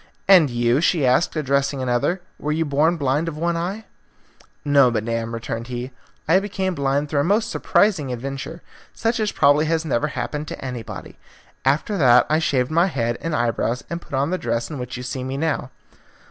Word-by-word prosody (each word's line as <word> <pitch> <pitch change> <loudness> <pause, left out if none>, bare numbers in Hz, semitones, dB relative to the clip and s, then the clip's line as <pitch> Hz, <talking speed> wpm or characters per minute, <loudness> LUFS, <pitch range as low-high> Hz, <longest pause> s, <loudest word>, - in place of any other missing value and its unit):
"And 180 -7 +7
you," 120 +3 +1
she 165 -4 +2
asked, 130 +8 +2
addressing 140 -2 0
another, 130 +8 0 0.2
"were 150 - -2
you 160 +1 0
born 155 +4 +2
blind 145 +2 0
of 160 -2 -4
one 170 +2 0
eye?" 190 +6 -3 0.8
"No, 140 -3 +5
madam," 115 0 -2
returned 115 0 -5
he, 125 +1 -5 0.4
"I 170 +4 +5
became 195 -2 -2
blind 140 -1 0
through 145 -1 0
a - - +3
most 210 +6 +1
surprising 180 -11 +2
adventure, 135 +6 -6 0.3
such 230 +1 0
as 215 -1 0
probably 145 +1 +4
has 165 +1 0
never 145 -1 0
happened 150 0 -4
to - - -7
anybody. 120 -4 -7 0.5
After 155 +9 +1
that 125 -4 +6
I 155 - +4
shaved 130 -4 0
my 170 +3 +3
head 120 -8 -2
and 165 -1 -2
eyebrows 120 0 0
and 170 0 -3
put 140 - -7
on 140 +4 0
the 185 - -1
dress 115 +1 -2
in 145 - -5
which 125 0 -5
you 125 - -6
see 125 +1 -4
me 130 +1 -4
now." 155 -4 -1
145 Hz, 190 wpm, -22 LUFS, 125-165 Hz, 0.8 s, And